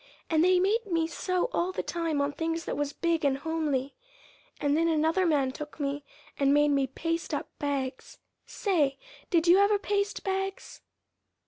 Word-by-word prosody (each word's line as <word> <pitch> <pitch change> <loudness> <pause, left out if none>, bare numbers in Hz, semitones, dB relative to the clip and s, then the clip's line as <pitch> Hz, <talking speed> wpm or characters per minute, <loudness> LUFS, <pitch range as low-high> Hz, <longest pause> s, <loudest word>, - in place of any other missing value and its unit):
And 320 0 +4
they 365 0 +5
made 415 +4 +1
me 330 -3 +1
sew 365 +3 -1
all 355 +2 0
the 375 - -3
time 330 -4 -1
on 280 +1 0
things 330 +2 -3
that - - -3
was 290 -1 -1
big 335 0 0
and 275 -2 +2
homely, 290 -3 -1 0.7
and 285 0 +1
then 330 +1 +2
another 325 +3 +2
man 280 -5 +2
took 295 +3 -9
me 285 0 -2 0.4
and 275 -1 +4
made 295 +1 +4
me 275 -2 +2
paste 330 +5 -3
up - - -4
bags. 270 -3 -3 0.3
Say, 305 -9 0 0.3
did 340 -2 +2
you 355 +3 +7
ever 405 +1 +4
paste 405 0 -1
bags?" 385 0 -3
325 Hz, 175 wpm, -28 LUFS, 285-360 Hz, 0.7 s, you